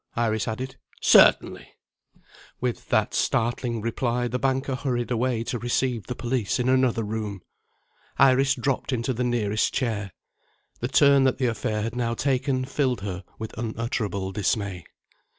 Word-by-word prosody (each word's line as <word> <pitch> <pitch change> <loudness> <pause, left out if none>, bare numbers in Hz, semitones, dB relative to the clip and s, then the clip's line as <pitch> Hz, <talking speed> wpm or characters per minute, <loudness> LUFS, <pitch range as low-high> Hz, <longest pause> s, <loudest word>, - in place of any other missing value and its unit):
Iris 110 -2 0
added. 130 +4 -4 0.2
"Certainly!" - - +5 0.9
With 125 -1 -3
that - - +2
startling 120 0 0
reply, 120 +2 -1
the 125 +1 -2
banker 135 +1 0
hurried 125 -2 -2
away 120 -1 0
to 120 +1 -3
receive 120 -1 -1
the 125 - -4
police 120 -4 -1
in 125 - 0
another 130 -3 +2
room. 105 -2 -4 0.8
Iris 135 0 +4
dropped 135 +2 -1
into 125 +1 -1
the 125 +1 -2
nearest 110 -4 0
chair. 110 -6 -1 0.7
The 120 - -2
turn 140 0 +5
that 130 - +2
the 130 - 0
affair 110 -2 -1
had 115 +1 -4
now 115 -1 -1
taken 130 0 0
filled 130 -5 -1
her 95 -2 -5
with 110 0 -7
unutterable 110 -4 -3
dismay. 100 -3 -2
120 Hz, 145 wpm, -25 LUFS, 110-130 Hz, 0.9 s, Certainly